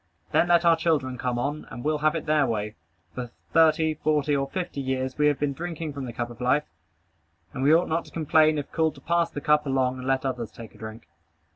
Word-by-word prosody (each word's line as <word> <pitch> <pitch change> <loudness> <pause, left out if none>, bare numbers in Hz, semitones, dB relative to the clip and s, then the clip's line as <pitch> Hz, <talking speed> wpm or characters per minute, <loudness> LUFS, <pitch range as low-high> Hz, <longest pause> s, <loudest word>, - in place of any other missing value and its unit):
Then 175 - +3
let 175 0 +4
our 165 -1 +6
children 145 -6 0
come 125 -1 -1
on 145 +5 -3
and 120 - -8
we'll 150 0 0
have 155 +2 +2
it 165 - -3
their 150 -3 +3
way. 105 -2 -2 0.4
For 125 -1 -5 0.2
thirty, 160 -1 +4
forty, 150 -1 +1
or 135 -1 -1
fifty 175 -5 -4
years, 130 0 -2
we 150 - +5
have 145 -2 +2
been 145 -1 0
drinking 165 -1 -5
from 140 -2 -5
the 120 - -5
cup 120 +1 -4
of 120 +1 -12
life; 130 +4 +2 0.9
and 130 - -4
we 140 +3 +4
ought 170 +3 +4
not 165 +1 -1
to - - -15
complain 155 -1 +3
if 145 - -5
called 160 -2 +1
to 135 - -14
pass 170 +3 +1
the 145 - -6
cup 150 -1 +2
along 130 -1 0
and 130 - -6
let 135 0 +1
others 125 -4 -3
take 115 -2 -11
a - - -17
drink. 110 +1 -9
145 Hz, 240 wpm, -26 LUFS, 130-155 Hz, 0.9 s, our